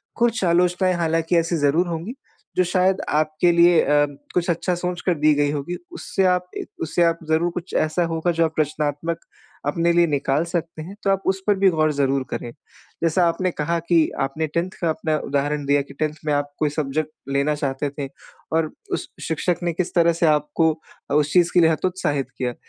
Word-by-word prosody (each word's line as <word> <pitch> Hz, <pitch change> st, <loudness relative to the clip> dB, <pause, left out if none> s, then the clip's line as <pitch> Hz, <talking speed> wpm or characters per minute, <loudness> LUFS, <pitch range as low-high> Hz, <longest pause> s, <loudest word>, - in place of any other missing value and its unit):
कुछ 235 Hz, -3 st, +1 dB
आलोचनाएँ 180 Hz, +2 st, +2 dB
हालाँकि 165 Hz, 0 st, +1 dB
ऐसी 165 Hz, +1 st, +1 dB
ज़रूर 155 Hz, +4 st, +2 dB
होंगी, 170 Hz, +7 st, -4 dB, 0.4 s
जो 185 Hz, -, +5 dB
शायद 185 Hz, +1 st, +1 dB
आपके 155 Hz, +3 st, +2 dB
लिए 170 Hz, 0 st, +5 dB
अ, 145 Hz, 0 st, +3 dB, 0.3 s
कुछ 175 Hz, 0 st, 0 dB
अच्छा 175 Hz, +2 st, 0 dB
सोच 175 Hz, 0 st, -3 dB
कर 180 Hz, -, +3 dB
दी 155 Hz, 0 st, +5 dB
गई 145 Hz, 0 st, +2 dB
होंगी 150 Hz, +4 st, -3 dB
उससे 200 Hz, -, -1 dB
आप 180 Hz, 0 st, +2 dB
ए, -, -, -4 dB, 0.2 s
उससे 165 Hz, +2 st, +1 dB
आप 165 Hz, 0 st, +2 dB
ज़रूर 165 Hz, +2 st, +2 dB
कुछ 175 Hz, +1 st, -7 dB
ऐसा 175 Hz, +3 st, 0 dB
होगा 165 Hz, +2 st, 0 dB
जो 165 Hz, 0 st, +2 dB
आप 160 Hz, -, -3 dB
रचनात्मक 150 Hz, +2 st, -1 dB, 0.5 s
अपने 170 Hz, +3 st, +2 dB
लिए 170 Hz, 0 st, +4 dB
निकाल 140 Hz, 0 st, +1 dB
सकते 170 Hz, -2 st, -4 dB
हैं। 190 Hz, +5 st, -9 dB
तो 195 Hz, -, +1 dB
आप 195 Hz, 0 st, 0 dB
उस 190 Hz, 0 st, +1 dB
पर 205 Hz, -, +4 dB
भी 195 Hz, -, +6 dB
गौर 155 Hz, -3 st, +2 dB
ज़रूर 135 Hz, -1 st, +1 dB
करें। 120 Hz, -, -5 dB, 0.5 s
जैसा 170 Hz, +2 st, +3 dB
आपने 180 Hz, +2 st, -1 dB
कहा 165 Hz, +2 st, -1 dB
कि 165 Hz, -3 st, +4 dB
आपने 140 Hz, +4 st, -1 dB
10th 170 Hz, +4 st, -1 dB
का 170 Hz, -, +1 dB
अपना 155 Hz, 0 st, 0 dB
उदाहरण 145 Hz, +1 st, -1 dB
दिया 140 Hz, 0 st, +3 dB
कि 140 Hz, 0 st, -10 dB
10th 155 Hz, -1 st, 0 dB
में 150 Hz, -, +1 dB
आप 145 Hz, 0 st, -1 dB
कोई 150 Hz, -, +2 dB
सब्जेक्ट 150 Hz, +1 st, -2 dB, 0.2 s
लेना 140 Hz, +2 st, +1 dB
चाहते 140 Hz, 0 st, -2 dB
थे 140 Hz, 0 st, -5 dB, 0.5 s
और 160 Hz, -1 st, +1 dB, 0.2 s
उस -, -, -2 dB, 0.2 s
शिक्षक 165 Hz, +2 st, 0 dB
ने 170 Hz, -1 st, 0 dB
किस 180 Hz, +1 st, -2 dB
तरह 170 Hz, -1 st, +4 dB
से 170 Hz, +1 st, 0 dB
आपको 150 Hz, +2 st, +2 dB, 0.4 s
अ, -, -, +1 dB
उस 150 Hz, 0 st, +2 dB
चीज़ 175 Hz, -2 st, +4 dB
के 180 Hz, -, +5 dB
लिए 160 Hz, -, +5 dB
हतोत्साहित 160 Hz, -5 st, -1 dB
किया। 125 Hz, -1 st, -2 dB
165 Hz, 205 wpm, -22 LUFS, 150-175 Hz, 0.5 s, भी